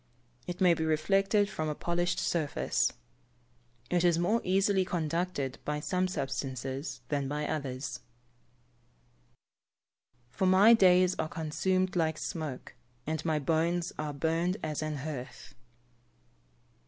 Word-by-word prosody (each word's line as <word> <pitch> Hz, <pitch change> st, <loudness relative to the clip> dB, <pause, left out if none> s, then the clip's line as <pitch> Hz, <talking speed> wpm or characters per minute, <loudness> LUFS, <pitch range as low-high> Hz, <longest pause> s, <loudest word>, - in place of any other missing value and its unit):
It 180 Hz, 0 st, -5 dB
may 180 Hz, -3 st, +5 dB
be 160 Hz, -, -2 dB
reflected 195 Hz, +6 st, +2 dB
from 155 Hz, -6 st, -3 dB
a 150 Hz, -, -2 dB
polished 175 Hz, +2 st, -1 dB
surface. 155 Hz, -4 st, 0 dB, 1.0 s
It 175 Hz, -1 st, +2 dB
is 175 Hz, -2 st, +4 dB
more 210 Hz, +7 st, +1 dB
easily 190 Hz, +1 st, +2 dB
conducted 165 Hz, -5 st, -2 dB
by 150 Hz, 0 st, -2 dB
some 180 Hz, +5 st, 0 dB
substances 135 Hz, -3 st, -4 dB
than 140 Hz, -2 st, -1 dB
by 150 Hz, +2 st, -2 dB
others. 140 Hz, -3 st, -4 dB, 1.3 s
[Verse: -, -, -38 dB, 0.9 s
"For 190 Hz, -, -1 dB
my 195 Hz, +5 st, +7 dB
days 185 Hz, -4 st, +5 dB
are 155 Hz, -, -1 dB
consumed 185 Hz, +4 st, -1 dB
like 160 Hz, -2 st, +1 dB
smoke, 155 Hz, -8 st, -5 dB, 0.3 s
and 155 Hz, 0 st, -2 dB
my 160 Hz, -2 st, +1 dB
bones 165 Hz, +4 st, 0 dB
are 150 Hz, -1 st, -2 dB
burned 165 Hz, +6 st, 0 dB
as 155 Hz, -1 st, -2 dB
an 155 Hz, -1 st, -3 dB
hearth." 135 Hz, -3 st, -7 dB
160 Hz, 125 wpm, -30 LUFS, 150-180 Hz, 1.3 s, my